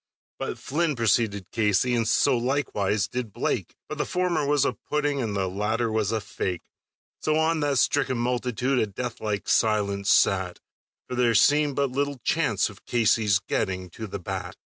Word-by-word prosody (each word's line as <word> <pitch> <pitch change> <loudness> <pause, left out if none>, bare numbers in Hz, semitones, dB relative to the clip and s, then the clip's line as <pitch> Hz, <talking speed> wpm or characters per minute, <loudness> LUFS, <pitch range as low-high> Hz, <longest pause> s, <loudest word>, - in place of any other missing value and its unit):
But - - -4
Flynn 155 +1 -1
preceded 110 -4 0
Casey, 110 +2 +2
and 115 -2 +1
so 130 +3 +3
likewise 115 -6 0
did 120 -1 -4
Blake, - - -2
But - - -6
the - - +1
former 175 -5 0
was 145 -1 +3
a - - +1
pudding, 145 -2 -2
and 110 -4 -2
the 95 -1 0
latter 110 +5 -1
was 110 -2 0
a 110 - 0
fake; 100 -5 -4 0.6
So 155 - 0
on 160 +1 +2
that 145 -2 +1
stricken 135 0 +2
multitude 125 +2 0
a 110 - +1
death 115 +4 -6
like 105 -2 -2
silence 100 -3 +1
sat, 95 -2 +3 0.5
For - - -6
there 120 -2 +2
seemed 145 +3 +4
but 140 -2 0
little 140 +1 -1
chance 115 - +1
of 105 -2 -13
Casey's 110 -4 +3
getting 95 -1 -3
to 110 +5 -7
the 100 - -5
bat. 90 -2 -5
115 Hz, 175 wpm, -25 LUFS, 100-140 Hz, 0.6 s, seemed